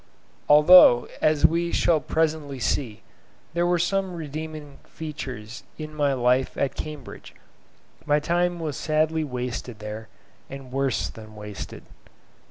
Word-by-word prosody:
Although, 150 -4 +8
as 155 -1 +3
we 170 +1 +2
shall 165 -2 +3
presently 155 -1 -1
see, 120 -3 -2 0.5
there 170 +1 +1
were 175 0 +2
some 190 +1 -1
redeeming 155 -2 -7
features 130 -7 -7 0.2
in 155 -1 -7
my 145 -2 +1
life 125 +1 +1
at 140 - 0
Cambridge, 155 -1 -8 0.7
my 150 0 +3
time 175 +3 0
was 155 -4 -3
sadly 155 +1 0
wasted 125 -3 -5
there, 105 +1 -7 0.4
and 135 -2 -9
worse 135 -1 0
than 110 -1 -12
wasted. 105 -1 -8
150 Hz, 125 wpm, -25 LUFS, 125-160 Hz, 0.7 s, Although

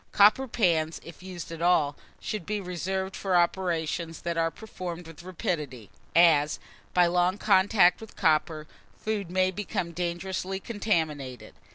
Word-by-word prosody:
Copper 215 +6 +5
pans, 165 -8 +1
if 170 0 -12
used 180 -3 -8
at 165 0 -7
all, 160 -5 +3 0.2
should 215 -4 -4
be 210 +3 -2
reserved 190 +1 -3
for 190 -2 -1
operations 170 -2 0
that 170 0 -2
are 165 0 +1
performed 180 -3 -7
with 165 -1 -11
rapidity; 150 - -4 0.2
as, 155 -3 +5 0.3
by 180 -1 +4
long 180 +2 +2
contact 190 -2 +4
with 220 - -11
copper, 155 0 +1 0.3
food 210 -4 -3
may 185 +1 +2
become 190 -2 -3
dangerously 180 +2 -3
contaminated. 155 - -2
175 Hz, 140 wpm, -27 LUFS, 165-190 Hz, 0.3 s, Copper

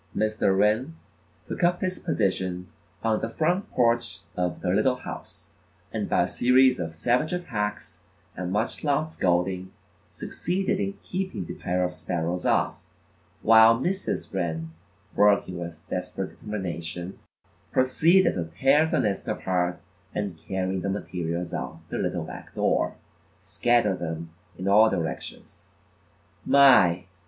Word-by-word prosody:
Mr. 110 -2 +1
Wren 110 +10 +2 0.5
took - - -4
up 175 +1 +3
his 185 0 -2
position 95 -3 -1 0.4
on 110 -1 +1
the 115 - -2
front 175 - 0
porch 115 -3 +1
of 90 -1 -2
the 90 - -1
little 110 +8 +3
house, 125 - -9 0.4
and - - -2
by - - +3
a - - -1
series 130 +1 +4
of 80 -2 -4
savage 125 - +1
attacks 115 -13 -3 0.3
and 90 0 -4
much 105 +3 -1
loud 150 +1 +1
scolding, 90 - 0 0.4
succeeded 190 +2 -2
in 200 -1 -1
keeping 185 - -3
the - - -6
pair 90 +1 -1
of 90 0 -1
sparrows 90 0 -2
off, - - +2 0.7
while 115 +1 +7
Mrs. 185 - -2
Wren, 80 -3 -2 0.4
working 100 -3 +3
with 85 -1 -6
desperate 90 +1 -4
determination, 90 -3 -5 0.5
proceeded 165 +9 +4
to 85 - -2
tear 145 +4 +5
the - - +1
nest 100 -2 -2
apart 90 -1 -1 0.4
and 100 -4 -2
carrying 95 +2 -3
the 100 - -2
materials 90 -3 -3
out - - -4
the - - -3
little - - -1
back - - -10
door, - - +1 0.4
scattered 120 -5 +1
them 80 -1 -5 0.3
in 95 - -4
all 105 +3 +6
directions. 85 -6 -5 0.7
My! 115 -11 +6
105 Hz, 135 wpm, -26 LUFS, 90-130 Hz, 0.7 s, while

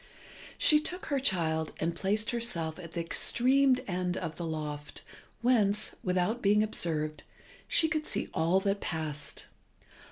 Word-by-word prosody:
She 300 - +5
took 355 +4 -2
her 280 -3 0
child 160 - +1
and 165 +1 -1
placed 210 +4 0
herself 180 -10 -1
at 165 -2 -10
the 170 - -2
extreme 255 +9 +3
end 180 -1 -1
of 165 -3 -4
the 170 - -4
loft 150 -2 -5 0.4
whence, 215 -4 +2
without 185 +6 0
being 210 +1 +4
observed, 155 -7 -1 0.5
she 320 - +4
could 310 0 -2
see - - +2
all 170 +4 +2
that 200 0 -1
passed. 150 -3 -4
185 Hz, 140 wpm, -30 LUFS, 160-235 Hz, 0.5 s, She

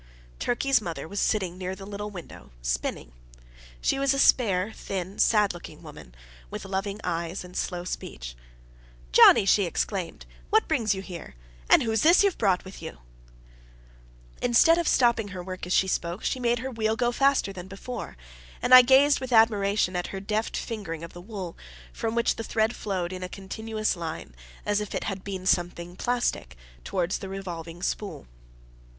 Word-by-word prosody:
Turkey's 260 0 +2
mother 170 -4 -5
was 200 +3 -4
sitting 185 -4 0
near 185 0 -3
the 195 0 -10
little 205 +1 -5
window, 175 - -10
spinning. - - -2 0.7
She - - +1
was 275 0 +2
a - - -2
spare, 205 -7 +3
thin, 190 0 -5
sad 210 -4 +4
looking 175 - -11
woman, - - -12 0.3
with - - -6
loving 195 +1 -3
eyes 170 +1 -3
and 180 0 -12
slow 175 -1 -2
speech. - - -6 0.8
"Johnnie!" 125 - +8
she 200 0 +4
exclaimed, 180 +1 -3 0.2
"what 440 +1 +3
brings 230 - +1
you 190 - -6
here? 170 - -9 0.3
and - - +6
who's 220 -2 0
this 345 +5 +6
you've 400 -3 +1
brought 190 -4 +2
with 190 - -10
you?" 160 - -7 1.4
Instead 325 +8 +5
of 340 - -1
stopping 235 -4 +3
her 185 -3 -7
work 185 -1 -6
as 180 - -1
she 190 - +3
spoke, 175 +1 -2
she 260 - -1
made 240 -1 +1
her 260 +2 -4
wheel 220 -2 0
go 240 +1 +1
faster 275 -5 +2
than 180 -1 -8
before; 205 - -7 0.4
and 255 - +2
I 255 - +13
gazed 270 +3 +5
with 260 -1 -6
admiration 205 -4 +3
at 180 0 -1
her 195 - -5
deft 215 +3 -2
fingering 165 -8 -5
of 170 - -9
the 175 - -10
wool, 190 -3 -7 0.4
from 225 0 -3
which 235 0 +1
the 225 - -4
thread 220 +1 0
flowed 185 -3 -3
in 185 - -6
a 180 - -5
continuous 215 +3 -3
line, 165 - -6 0.3
as 205 0 +1
if 210 - -5
it - - -2
had 195 -2 -4
been 190 -2 -5
something 175 -1 0
plastic, 240 - -2 0.3
towards 180 0 -1
the 195 - -7
revolving 175 -3 -7
spool. 205 - -3
195 Hz, 175 wpm, -26 LUFS, 180-225 Hz, 1.4 s, I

